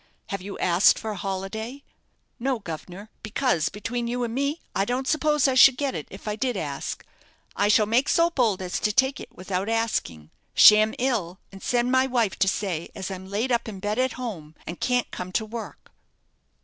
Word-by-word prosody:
"Have 195 -1 -3
you 200 +2 -7
asked 180 +2 +4
for 220 - -4
a - - -5
holiday?" 200 +8 -5 0.6
"No, 260 +1 0
guv'nor; 185 +2 -8
because, 220 - 0
between 235 +4 -4
you 245 +1 -2
and 230 -1 -3
me, 280 +5 -1 0.2
I 195 - +2
don't 250 +5 -2
suppose 300 -2 +2
I 265 - +2
should 260 0 +7
get 280 -2 -1
it 150 - -5
if 195 +3 -11
I 210 - -1
did 245 -1 -1
ask. 145 -5 -5 0.5
I 205 - +2
shall 210 +1 +4
make 235 +6 +2
so 335 0 +3
bold 225 - +1
as 180 - -3
to 210 - +1
take 265 +5 +2
it - - -9
without 185 +2 -3
asking. 220 - -2 0.2
Sham 215 +1 +7
ill, 220 -9 -1
and 195 -1 -12
send 245 0 +1
my 260 0 +3
wife 235 -6 +1
to 195 - +3
say 185 -4 -2
as 195 -1 -5
I'm 190 0 -7
laid 215 +6 -1
up 235 -1 +1
in 200 -3 -8
bed 210 +4 -2
at 260 0 +1
home, 180 -12 -7
and 170 - -7
can't 250 -1 0
come 180 0 -6
to 220 - 0
work." 225 +1 -8
220 Hz, 200 wpm, -25 LUFS, 190-250 Hz, 0.6 s, should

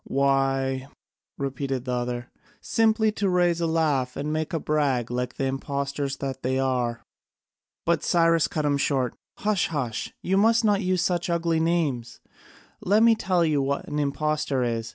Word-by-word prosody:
"Why," 135 -1 +1 0.5
repeated 135 -2 -3
the 125 - -2
other, 120 0 -3 0.3
"simply 220 -1 +2
to 205 -2 -1
raise 175 -2 +2
a 165 - +1
laugh, 150 -6 0
and 150 +2 -2
make 155 +2 -2
a 165 - -1
brag 140 -6 0
like 125 0 -2
the 135 - -1
impostors 140 +1 -2
that 135 -1 -4
they 130 +1 0
are." 125 -3 -1 0.8
But 170 -1 +1
Cyrus 165 -2 +3
cut 155 -2 -2
him 145 -1 +2
short, 135 -3 0 0.2
"Hush! 205 -3 +1
hush! 135 -8 -3
You 190 +1 +1
must 225 +3 +4
not 205 -1 +3
use 185 -2 +1
such 180 -1 0
ugly 170 -1 +1
names. 155 -8 -1 0.6
Let 210 +4 +3
me 230 0 +7
tell 185 -5 +1
you 150 -3 +2
what 140 +1 -2
an 150 - -2
impostor 145 -2 0
is. 115 -2 -2
145 Hz, 165 wpm, -25 LUFS, 135-170 Hz, 0.8 s, me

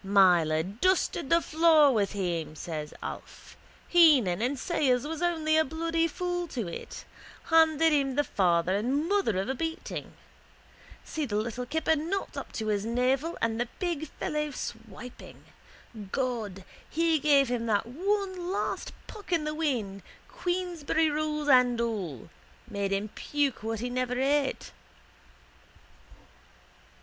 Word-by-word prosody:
—Myler 175 -5 +4
dusted 275 - 0
the 335 0 +4
floor 315 -2 +5
with 205 -3 0
him, 170 -6 -2
says 155 -2 -5
Alf. - - -8 0.3
Heenan 275 - +5
and 260 +4 0
Sayers 260 -4 +1
was 320 +1 -5
only 320 -3 +1
a 315 - +5
bloody 330 +2 0
fool 355 +1 -3
to 240 - -4
it. 170 - -8 0.5
Handed 320 -1 +5
him 275 -3 +1
the 290 - +3
father 180 -6 +1
and 265 +9 0
mother 390 - +1
of 190 +3 -1
a 265 - 0
beating. 325 +4 -5 0.9
See 310 -3 -3
the 205 - -3
little 235 +3 -2
kipper 320 +3 +1
not 340 +6 -3
up - - -6
to 220 -1 -3
his 205 -1 0
navel 255 +7 0
and 225 0 0
the 240 - -1
big 340 -4 -2
fellow 300 +1 -3
swiping. 240 -2 -9 0.7
God, 220 -8 -3 0.2
he 325 0 +2
gave 280 -3 +4
him 235 -2 -2
one 360 - -1
last 400 - -2
puck 415 -3 -11
in 335 -3 +2
the 305 0 -2
wind, 240 -11 -2 0.3
Queensberry 350 -7 -1
rules 300 0 -2
and 250 -3 +5
all, 195 - -3 0.4
made 200 -3 -2
him 200 +2 -1
puke 285 +3 -1
what 225 0 -3
he 245 - -2
never 250 0 -1
ate. 275 0 0
270 Hz, 140 wpm, -28 LUFS, 220-320 Hz, 0.9 s, floor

